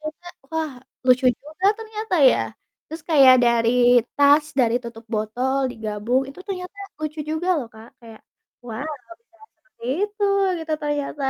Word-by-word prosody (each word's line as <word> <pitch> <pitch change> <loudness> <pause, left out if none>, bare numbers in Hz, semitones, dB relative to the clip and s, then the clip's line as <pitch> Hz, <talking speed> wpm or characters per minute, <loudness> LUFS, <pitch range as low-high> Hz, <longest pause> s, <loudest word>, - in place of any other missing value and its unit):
ternyata 310 +3 -8 0.3
wah 320 -1 -1 0.4
lucu 255 0 +4 0.2
juga 315 +6 -10
ternyata 440 -3 -5 0.2
ya, - - +1 0.5
terus 320 +2 -9
kayak 270 -5 +8
dari 235 -1 +3 0.5
tas, 285 +1 +5 0.2
dari 235 -2 +2
tutup 235 -1 -10
botol, 245 +5 -1
digabung 225 +3 -1
itu 275 +6 -11
ternyata 370 0 -6 0.2
lucu 310 0 -5
juga 315 +3 -2
loh 260 - -5
Kak, 220 +1 -13
kayak 225 -2 -14 0.5
"Wah, 230 +3 -5 0.2
kok 340 - -12
bisa 420 -8 -32 0.2
seperti - - -19 0.2
itu," 415 0 -4 0.4
gitu 320 -1 -5
ternyata. 290 -1 -3
285 Hz, 150 wpm, -22 LUFS, 235-330 Hz, 0.5 s, kayak